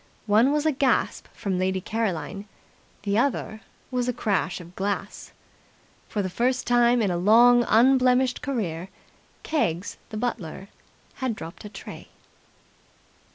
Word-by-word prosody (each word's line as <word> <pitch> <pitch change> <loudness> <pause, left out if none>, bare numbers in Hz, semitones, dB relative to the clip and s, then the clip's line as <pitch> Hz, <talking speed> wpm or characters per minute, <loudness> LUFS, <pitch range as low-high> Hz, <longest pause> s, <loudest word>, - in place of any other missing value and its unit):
One 220 +6 +4
was 300 +1 0
a 315 - +4
gasp 270 -1 0
from 195 -5 -3
Lady 190 0 0
Caroline. 205 -2 -3 0.6
The 200 +1 +1
other 235 -4 -1 0.3
was 250 -1 -1
a 250 - 0
crash 195 -6 -1
of 175 0 -13
glass. 200 +1 -4 0.8
For 205 - -1
the - - -1
first 250 +5 0
time 240 -1 +4
in 195 - +1
a 175 - -1
long 240 +6 +6
unblemished 255 +2 +4
career 190 - -3 0.5
Keggs 185 - -1
the 215 - -6
butler 200 -5 -4 0.5
had 260 -4 -2
dropped 165 +2 -9
a - - -7
tray. 200 - -10
220 Hz, 135 wpm, -25 LUFS, 190-250 Hz, 0.8 s, long